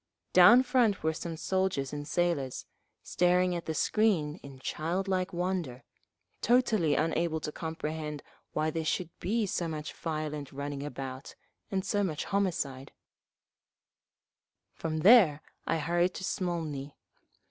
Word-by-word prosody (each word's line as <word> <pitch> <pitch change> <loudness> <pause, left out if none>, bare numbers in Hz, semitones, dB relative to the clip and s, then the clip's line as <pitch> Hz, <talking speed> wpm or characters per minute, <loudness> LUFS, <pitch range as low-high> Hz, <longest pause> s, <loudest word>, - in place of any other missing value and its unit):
Down 220 +8 +8
front 240 -6 +2
were 160 0 +1
some 165 +1 -5
soldiers 185 -5 -1
and 145 0 -5
sailors, 165 -8 -1 0.4
staring 180 0 +2
at 170 - -5
the 160 - -2
screen 180 -6 +1
in 140 -1 -11
childlike 185 +7 -2
wonder, 175 -8 -2 0.6
totally 220 - +3
unable 160 +1 0
to 150 - -4
comprehend 155 -2 -5 0.3
why 155 +1 0
there 160 +1 -2
should 165 +2 -1
be 220 +3 0
so 175 -3 -2
much 155 -1 -5
violent 155 -3 -4
running 140 0 -5
about, 135 -2 -6 0.3
and 190 -1 -1
so 205 +1 +1
much 155 -6 -2
homicide…. 160 -9 -2 1.8
From 160 -1 -3
there 180 -7 +7 0.2
I 165 - +1
hurried 175 +3 +1
to - - -6
Smolny. 160 -7 -3
165 Hz, 125 wpm, -30 LUFS, 150-185 Hz, 1.8 s, Down